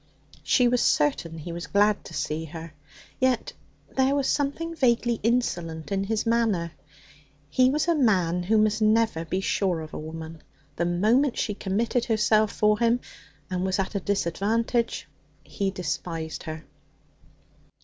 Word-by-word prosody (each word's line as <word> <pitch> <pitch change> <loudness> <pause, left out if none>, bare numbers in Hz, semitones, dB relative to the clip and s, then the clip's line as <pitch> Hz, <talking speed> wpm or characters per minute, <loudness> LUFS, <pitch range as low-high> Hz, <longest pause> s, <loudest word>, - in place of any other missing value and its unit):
She 250 -2 +3
was 245 0 +2
certain 160 +3 +1
he 160 +2 -7
was 170 -2 -6
glad 205 +1 +2
to - - -10
see 155 +2 -2
her. 165 0 -9 0.5
Yet 255 -2 +1 0.4
there 265 +1 +3
was 280 -2 +1
something 300 +4 -1
vaguely 240 -4 +2
insolent 175 -9 -1
in 195 0 0
his 220 +2 -1
manner. 225 -8 +1 0.8
He 255 +6 +4
was 300 +4 0
a 340 - +4
man 185 - +2
who 210 +5 +2
must 215 0 +2
never 215 -6 +2
be 185 +4 -2
sure 190 -3 0
of 155 -1 -8
a - - -5
woman. 160 0 -8 0.3
The 170 - 0
moment 225 +10 +2
she 210 - -1
committed 225 +5 -1
herself 215 -1 +3
for 210 0 +2
him 235 +1 +3 0.5
and 185 -2 -2
was 190 -1 0
at 195 +1 -2
a 200 - 0
disadvantage 205 +5 0 0.4
he 200 -2 -2
despised 165 -2 -4
her. 155 0 -6
205 Hz, 150 wpm, -26 LUFS, 170-235 Hz, 0.8 s, He